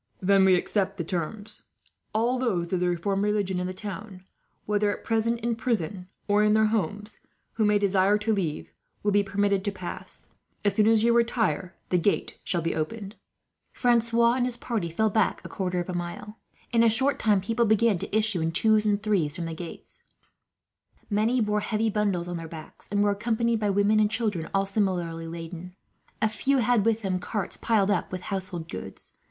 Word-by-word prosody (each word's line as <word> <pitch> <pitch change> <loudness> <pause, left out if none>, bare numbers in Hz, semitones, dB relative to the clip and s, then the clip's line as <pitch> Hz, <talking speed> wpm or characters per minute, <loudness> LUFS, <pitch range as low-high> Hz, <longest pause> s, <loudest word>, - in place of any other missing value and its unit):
"Then 195 0 +4
we 190 -1 +6
accept 195 +2 -1
the 170 - -2
terms. 195 +5 -4 0.5
All 235 +4 +1
those 190 -9 -1
of 185 - +2
the 180 0 +1
reformed 195 +3 -1
religion 205 -3 0
in 180 - -2
the - - -3
town, 195 0 -7 0.4
whether 210 0 +1
at 205 - -4
present 230 +1 0
in 235 0 0
prison 200 -6 -2 0.2
or 205 0 +3
in 210 0 +4
their 220 0 +4
homes, 210 +1 -2 0.3
who 220 - +1
may 210 0 +4
desire 200 0 +3
to 215 +1 0
leave, 170 -7 -3 0.3
will 205 - +2
be 205 0 +4
permitted 200 0 0
to 205 - 0
pass. 185 -3 -8 0.4
As 205 - +3
soon 215 +1 +3
as 225 -1 +4
you 235 0 +4
retire, 225 -7 +1
the 180 - +2
gate 200 +4 0
shall 175 -3 -1
be 165 - 0
opened." 200 +6 -4 0.6
Francois 235 -1 +3
and 250 0 +1
his 250 -1 -1
party 220 -8 -2
fell 215 +6 +1
back 215 -2 +1
a - - -7
quarter 180 -2 -2
of 175 - -3
a 185 - -4
mile. 175 +5 -6 0.3
In 230 -1 +3
a 230 - +6
short 265 +5 +2
time, 210 -3 +3
people 230 +5 0
began 220 -2 +3
to 210 - -1
issue 215 -5 0
in 165 0 0
twos 215 +4 +3
and 205 0 +1
threes 180 -9 +1
from 175 -2 -4
the 165 - -4
gate. 165 +1 -9 1.1
Many 225 +4 +2
bore 210 -1 +1
heavy 215 +1 0
bundles 200 -5 0
on 175 -1 -4
their 165 -1 -6
backs, 160 -1 -9
and 205 0 +2
were 205 - +3
accompanied 230 +2 0
by 210 -1 0
women 205 +2 +3
and 210 -1 +3
children, 210 -7 -2
all 195 0 +1
similarly 180 -5 -1
laden. 170 +2 -8 0.5
A - - +5
few 265 +6 0
had 240 -3 +2
with 225 -1 +1
them 185 -2 -1
carts, 205 +1 -3
piled 210 -3 +1
up 185 - -1
with 185 -1 -4
household 185 -4 -5
goods. 95 - -8
205 Hz, 200 wpm, -26 LUFS, 180-220 Hz, 1.1 s, we